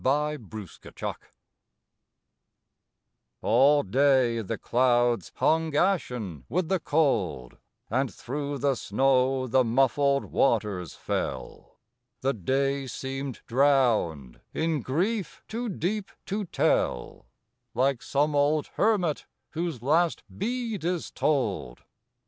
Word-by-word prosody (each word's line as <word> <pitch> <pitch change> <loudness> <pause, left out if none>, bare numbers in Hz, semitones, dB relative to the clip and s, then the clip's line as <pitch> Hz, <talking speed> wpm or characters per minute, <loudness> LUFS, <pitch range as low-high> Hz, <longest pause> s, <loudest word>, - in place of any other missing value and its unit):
MID 150 -3 0
WINTER 105 -6 -7 2.3
All 140 +6 +5
day 130 +1 +3
the 100 - -4
clouds 120 -1 +2
hung 160 -1 +1
ashen 125 - 0
with 175 -1 -1
the 190 -1 +2
cold; 110 - 0 0.3
And 130 +3 0
through 145 +2 -4
the 140 0 +1
snow 130 +3 +1
the 130 +1 +3
muffled 135 +3 +2
waters 105 - 0
fell; - - -5 0.4
The 135 +1 +1
day 135 +6 0
seemed 135 0 -5
drowned 115 - +2
in 160 -3 0
grief 185 - -2
too 235 +1 -3
deep 195 +2 -2 0.2
to 205 +1 -2
tell, - - 0 0.5
Like 130 0 +1
some 145 +2 0
old 145 +1 +2
hermit 195 -8 +1 0.2
whose 165 -7 -3
last 165 +5 +2
bead 230 - -3
is 175 0 -2
told. 105 - -1
135 Hz, 100 wpm, -27 LUFS, 120-155 Hz, 2.3 s, All